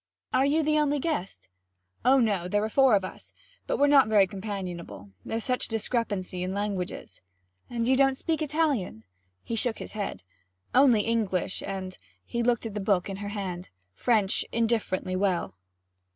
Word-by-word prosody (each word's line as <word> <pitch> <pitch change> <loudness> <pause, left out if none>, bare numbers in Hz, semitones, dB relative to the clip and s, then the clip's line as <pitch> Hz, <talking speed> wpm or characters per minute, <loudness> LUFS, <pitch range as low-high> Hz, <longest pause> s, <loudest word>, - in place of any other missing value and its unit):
'Are 265 +2 +4
you 310 +3 +2
the 305 0 +2
only 295 -1 +2
guest?' 285 - -3 0.6
'Oh, 260 +3 +5
no, 200 -7 +1
there 205 +3 +1
are 215 - -1
four 265 -1 +5
of 195 -2 +1
us, - - -10 0.3
but - - 0
we're 285 - +4
not 285 -4 +6
very 210 -3 +5
companionable; 185 - -6
there's 225 0 -3
such 250 -1 +1
a - - -22
discrepancy 210 -5 -2
in 185 +1 -2
languages.' 195 - -4 0.5
'And 235 -1 -2
you 260 - +4
don't 270 0 +3
speak 325 +1 -1
Italian?' 290 - 0 0.4
He 230 - -3
shook 230 0 0
his - - -7
head. 205 - -4 0.5
'Only 255 -4 +6
English 205 -5 -1
and' 190 -1 -5 0.3
he 235 - -2
glanced 235 -1 +1
at 220 - -4
the 210 - -3
book 195 -1 +1
in 190 - -5
her 205 0 -5
hand 185 -4 -5 0.2
'French 210 - +2
indifferently 220 -5 0
well.' 185 -2 0
215 Hz, 170 wpm, -27 LUFS, 190-255 Hz, 0.6 s, not